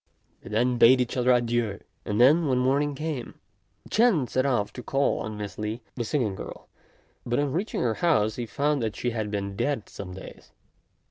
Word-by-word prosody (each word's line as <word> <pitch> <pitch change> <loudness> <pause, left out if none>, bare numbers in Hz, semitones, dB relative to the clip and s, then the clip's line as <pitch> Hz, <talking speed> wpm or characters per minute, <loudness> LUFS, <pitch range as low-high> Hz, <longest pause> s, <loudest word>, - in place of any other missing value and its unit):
They - - -11
then 120 +3 +1
bade 130 +2 +7
each 125 -1 -1
other 125 0 +3
adieu; 120 -4 +1 0.3
and, 105 - -2
when 135 +2 +5
morning 140 +3 +1
came, 150 -4 -4 0.6
Ch'ên 210 - +3
set 130 +3 0
off 120 -6 0
to 125 - -7
call 135 +3 0
on 110 -1 -5
Miss 105 -1 -6
Li, 110 +2 -4
the 120 - -3
singing 115 -4 0
girl; - - -9 0.6
but 120 0 -1
on 145 -1 0
reaching 185 - -2
her 115 - +1
house 110 -10 +2
he 120 -1 -3
found 145 +5 0
that 110 -2 -2
she 120 - -2
had 110 -2 -3
been 100 -1 -3
dead 140 +1 -1
some 90 -2 -8
days. 95 - -12
120 Hz, 190 wpm, -26 LUFS, 110-140 Hz, 0.6 s, bade